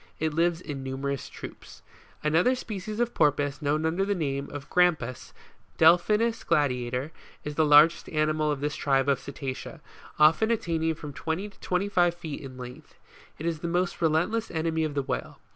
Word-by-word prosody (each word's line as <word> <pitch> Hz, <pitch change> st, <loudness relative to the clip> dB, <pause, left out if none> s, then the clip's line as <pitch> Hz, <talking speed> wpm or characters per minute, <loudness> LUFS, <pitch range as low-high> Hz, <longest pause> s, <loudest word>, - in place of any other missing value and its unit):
It 160 Hz, -1 st, -1 dB
lives 170 Hz, +1 st, +1 dB
in 145 Hz, -6 st, -6 dB
numerous 135 Hz, +1 st, -4 dB
troops. -, -, -11 dB, 0.4 s
40. -, -, 0 dB
Another 180 Hz, +12 st, +3 dB
species 215 Hz, -3 st, -6 dB
of 240 Hz, 0 st, 0 dB
Porpoise 145 Hz, -1 st, +1 dB
known 150 Hz, +2 st, 0 dB
under 170 Hz, +4 st, +1 dB
the 200 Hz, +1 st, 0 dB
name 140 Hz, -4 st, -2 dB
of 145 Hz, -1 st, -8 dB
Grampus, 160 Hz, -9 st, +1 dB, 0.5 s
Defpkimu 215 Hz, +6 st, +4 dB
Gladiator, 130 Hz, -2 st, 0 dB, 0.3 s
is 150 Hz, -, -4 dB
the 155 Hz, -, +2 dB
largest 150 Hz, +3 st, +6 dB
animal 155 Hz, 0 st, +1 dB
of 145 Hz, -2 st, -3 dB
this 145 Hz, 0 st, -1 dB
tribe 135 Hz, -1 st, +1 dB
of 140 Hz, -2 st, +2 dB
Cetacea, 135 Hz, +3 st, -6 dB, 0.4 s
often 160 Hz, +9 st, +5 dB
attaining 165 Hz, -7 st, 0 dB
from 150 Hz, -2 st, -8 dB
twenty 165 Hz, +9 st, -3 dB
to 200 Hz, -, -23 dB
twenty 185 Hz, +2 st, -1 dB
five 175 Hz, -3 st, +2 dB
feet 160 Hz, -4 st, -7 dB
in 130 Hz, -2 st, -9 dB
length. 125 Hz, 0 st, -10 dB, 0.4 s
It 155 Hz, -, -6 dB
is 165 Hz, -2 st, -1 dB
the 170 Hz, -, -4 dB
most 175 Hz, +1 st, -1 dB
relentless 175 Hz, +8 st, +1 dB
enemy 160 Hz, -1 st, -1 dB
of 150 Hz, -2 st, -4 dB
the 140 Hz, -, 0 dB
whale. -, -, -4 dB
160 Hz, 175 wpm, -27 LUFS, 145-175 Hz, 0.5 s, largest